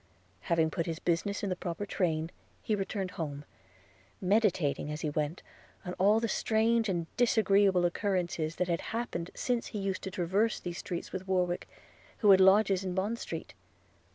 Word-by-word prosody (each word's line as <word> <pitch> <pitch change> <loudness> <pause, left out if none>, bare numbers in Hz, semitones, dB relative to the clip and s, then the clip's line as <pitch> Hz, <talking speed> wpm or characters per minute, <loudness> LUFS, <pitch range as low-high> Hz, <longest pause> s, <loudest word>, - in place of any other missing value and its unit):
Having 160 -2 +3
put 165 +1 -2
his 165 -1 -2
business 180 +5 -1
in 200 - -1
the - - 0
proper 175 +3 -4
train, 165 -4 -1 0.3
he 220 - 0
returned 195 -2 -2
home, 145 -3 -5 0.7
meditating, 185 -8 +1
as 150 - -5
he 150 - -1
went, 150 +3 -2 0.4
on 180 - -4
all 205 +4 +5
the 230 - -1
strange 225 0 +2
and 170 -3 -1
disagreeable 200 -6 +4
occurrences 175 -3 -1
that 180 - -1
had 170 -2 0 0.2
happened 180 -7 -3
since 245 -2 -1
he - - -6
used 195 -2 -2
to - - -4
traverse 190 +5 0
these 175 -1 -5
streets 175 -3 -5
with 190 0 -5
Warwick, 180 -2 0 0.5
who 210 -3 +5
had 190 0 +7
lodgings 195 0 +5
in 185 -1 -3
Bond 210 +5 -1
street. - - -6
185 Hz, 170 wpm, -30 LUFS, 170-205 Hz, 0.7 s, had